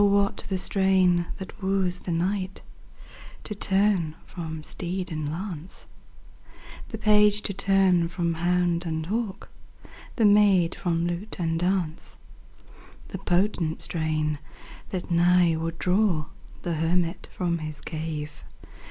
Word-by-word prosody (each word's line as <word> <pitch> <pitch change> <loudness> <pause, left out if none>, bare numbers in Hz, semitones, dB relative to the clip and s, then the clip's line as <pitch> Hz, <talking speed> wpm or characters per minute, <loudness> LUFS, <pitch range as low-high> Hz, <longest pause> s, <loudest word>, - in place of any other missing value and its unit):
what 200 0 +3
the 190 - 0
strain 185 -2 +3
that 195 +2 -9
woos 190 -2 0
the 180 - -5
knight 185 +3 -1 0.8
To 210 - -4
turn 195 -5 +1
from 160 -4 -6
steed 180 +3 -4
and 155 -2 -3
lance, 175 -1 -6 1.0
The 220 - -5
page 210 -1 +4
to 200 - -2
turn 190 -3 +3
from 170 0 -1
hound 175 +1 +1
and 160 -2 -3
hawk, 210 +1 -3 0.7
The 225 - +3
maid 200 -4 +5
from 170 -2 -1
lute 175 +5 -3
and 165 -1 0
dance; 175 -3 -1 0.9
The 190 - -6
potent 180 -3 0
strain, 155 -2 -1 0.5
that 180 -2 -4
nigh 175 0 +4
would 165 +1 -3
draw 180 -4 +2 0.4
The 175 - -1
hermit 165 +2 0
from 170 -2 0
his 155 -1 -6
cave. 155 -1 -5
180 Hz, 125 wpm, -26 LUFS, 165-195 Hz, 1.0 s, maid